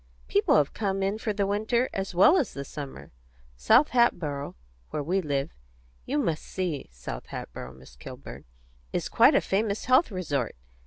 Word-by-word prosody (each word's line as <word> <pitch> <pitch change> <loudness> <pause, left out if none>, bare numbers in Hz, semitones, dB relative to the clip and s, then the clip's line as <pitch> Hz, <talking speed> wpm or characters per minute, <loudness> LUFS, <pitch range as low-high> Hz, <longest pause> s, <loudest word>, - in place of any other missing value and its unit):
People - - +3
have 145 -2 +2
come 195 -2 -1
in 200 +3 -1
for 220 - -1
the 200 -1 0
winter 220 +5 +1
as 195 -2 -4
well 195 - +7
as 290 - -1
the 140 0 -5
summer. 140 -1 -8 0.4
South 65 - +4
Hatboro', 155 - +1 0.3
where 150 - -3
we 185 +6 0
live 145 -1 -2 0.6
you - - 0
must 155 +1 0
see 175 -7 -4
South - - -7
Hatboro', 65 - -7
Miss 65 -1 -16
Kilburn! - - -10 0.5
is - - -2
quite - - +5
a - - +5
famous 205 +1 -1
health 255 +6 +4
resort. 150 - -2
180 Hz, 165 wpm, -27 LUFS, 140-205 Hz, 0.6 s, well